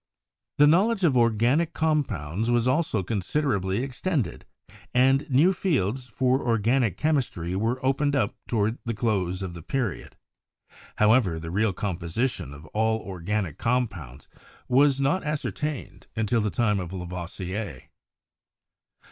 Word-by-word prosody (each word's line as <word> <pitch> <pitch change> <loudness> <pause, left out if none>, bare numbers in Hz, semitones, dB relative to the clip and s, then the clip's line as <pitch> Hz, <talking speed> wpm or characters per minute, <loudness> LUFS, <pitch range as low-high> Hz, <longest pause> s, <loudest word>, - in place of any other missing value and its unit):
The 145 - +7
knowledge 195 +7 +3
of 150 -7 +4
organic 120 +8 +2
compounds 115 - -1
was 120 0 +2
also 130 - +1
con 100 +2 -2
siderably 100 - 0
extended, 135 - -2 0.5
and 135 +3 +3
new 150 +9 +4
fields 130 - -1
for 130 +3 +1
organic 115 -2 +1
chemistry 125 - -1
were 115 +6 -1
opened 145 +2 +1
up 120 -7 +1
toward 110 +1 0
the 115 -2 -3
close 95 -5 -1
of 90 -2 -5
the 85 - -9
period. 120 - -3 0.8
However, 105 -6 +3
the 80 0 -6
real 105 +3 +2
composition 95 - -2
of 70 +2 -11
all 110 +1 +2
organic 95 -2 -3
compounds 90 - -2 0.4
was 135 +2 +4
not 140 +7 +1
as 150 0 -2
certained 150 -4 -5
until 115 +1 +1
the 105 - 0
time 105 -1 +1
of 90 -2 -5
Lavoisier. 90 -1 -5
115 Hz, 130 wpm, -26 LUFS, 95-135 Hz, 0.8 s, The